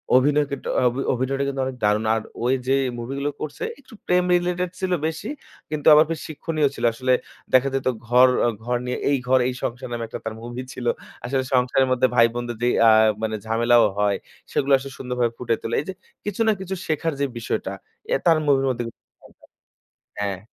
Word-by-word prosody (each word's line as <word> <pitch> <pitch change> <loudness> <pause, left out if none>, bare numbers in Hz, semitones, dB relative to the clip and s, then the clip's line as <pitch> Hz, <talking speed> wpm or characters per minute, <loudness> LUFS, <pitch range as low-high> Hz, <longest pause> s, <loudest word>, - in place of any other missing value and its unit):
অভিনয় 145 +3 +4
কিন্তু, 140 - -5 0.2
অভি 125 +3 -1
অভিনয়টা 135 +2 -1
কিন্তু 135 -1 -2
অনেক 130 -1 -5
দারুণ। 105 +1 +2
আর 110 - -1 0.2
ওই 125 - +3
যে 135 - +3 0.2
মুভি 120 +3 -5
গুলো 145 - 0
করছে 150 -1 -5 0.2
একটু 260 -4 -18
প্রেম 180 0 +3
related 180 0 +1
ছিল 185 -1 -2 0.2
বেশি। 160 +7 -5 0.4
কিন্তু 150 -2 -2
আবার 155 +1 +7
বেশ 160 - -2
শিক্ষণীয় 155 -1 0
ছিল - - -2
আসলে, 130 +2 +1 0.4
দেখা 130 +1 +5
যেত 135 -1 -1 0.2
ঘর 125 +2 +6 0.2
অ - - +3
ঘর 125 +1 0
নিয়ে 125 - -2
'এই 140 -1 +3
ঘর 130 +1 +4
এই 130 - -1
সংসার' 120 +2 -4
নামে 115 - -3
একটা - - -7
তার 110 - -3
movie 120 +2 -6
ছিল। 120 - -7 0.4
আসলে 130 +1 0
সংসারের 130 +1 +3
মধ্যে 130 0 +3
ভাই 115 -1 +6
বোনদের 120 -1 -4
যেই 120 - +3
আ - - +9 0.3
মানে 110 -1 -1
ঝামেলাও 120 +1 +4 0.2
হয় 100 -1 +2 0.3
সেগুলো 140 0 0
আসলে 135 +1 -8
সুন্দরভাবে 125 -2 -1
ফুটিয়ে 115 -2 -1
তোলে। 115 - -2
এই - - -10
যে 190 - -3 0.3
কিছু 205 +1 -3
না - - +6
কিছু 190 0 -4
শেখার 160 +1 0
যে 140 - +2
বিষয়টা, 115 - -3 0.4
এ - - +5
তার 165 -2 +5
movie 135 -2 +3
এর 135 - +1
মধ্যে 120 -1 -2
কিন্তু - - -13
পেতাম। - - -22 0.7
হ্যাঁ। 100 -2 -2
130 Hz, 205 wpm, -23 LUFS, 120-145 Hz, 0.7 s, আ